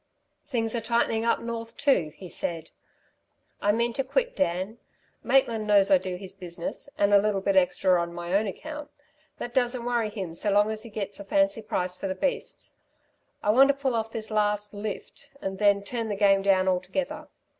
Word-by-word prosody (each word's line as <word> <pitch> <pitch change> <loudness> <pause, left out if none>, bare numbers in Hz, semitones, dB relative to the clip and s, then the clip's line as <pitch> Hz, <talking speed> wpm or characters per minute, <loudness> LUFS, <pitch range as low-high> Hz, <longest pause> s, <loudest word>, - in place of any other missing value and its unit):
"Things 230 -5 -1
are 235 - -1
tightening 225 0 +1
up 235 - +2
north, 230 0 -6
too?" 275 - +2
he 185 - -10
said, 170 -1 -5 0.9
"I 205 - +3
mean 235 +2 +1
to 270 - -1
quit, - - -1
Dan. 195 -1 -1 0.4
Maitland 230 -5 +2
knows 200 +1 +5
I 285 - +7
do 185 -5 -4
his 190 +1 -4
business 180 +7 -6
and 205 0 +3
a 200 - +8
little 205 -1 +1
bit 195 0 0
extra 185 -1 +3
on 170 0 -3
my 175 +1 -5
own 205 +2 +3
account. 300 +8 -7 0.5
That 240 - -6
doesn't 245 -1 0
worry 240 -3 0
him 190 -6 -5
so 200 +5 0
long 205 +2 +4
as 215 0 -3
he 230 - -7
gets 205 -2 -5
a - - -6
fancy 290 +3 +1
price 180 -4 -2
for 195 - -4
the 190 - -2
beasts. 275 +9 -3 0.7
I 210 - +4
want 265 +5 +7
to 280 - +3
pull 275 -2 -1
off 225 -1 -1
this 220 -1 -5
last 210 -1 0
'lift' 205 0 -7
and 190 -4 -4
then 200 -1 +4
turn 230 +1 -3
the 205 - -1
game 195 -1 +4
down 190 -1 +3
altogether. 185 +9 -2
210 Hz, 200 wpm, -27 LUFS, 195-235 Hz, 0.9 s, a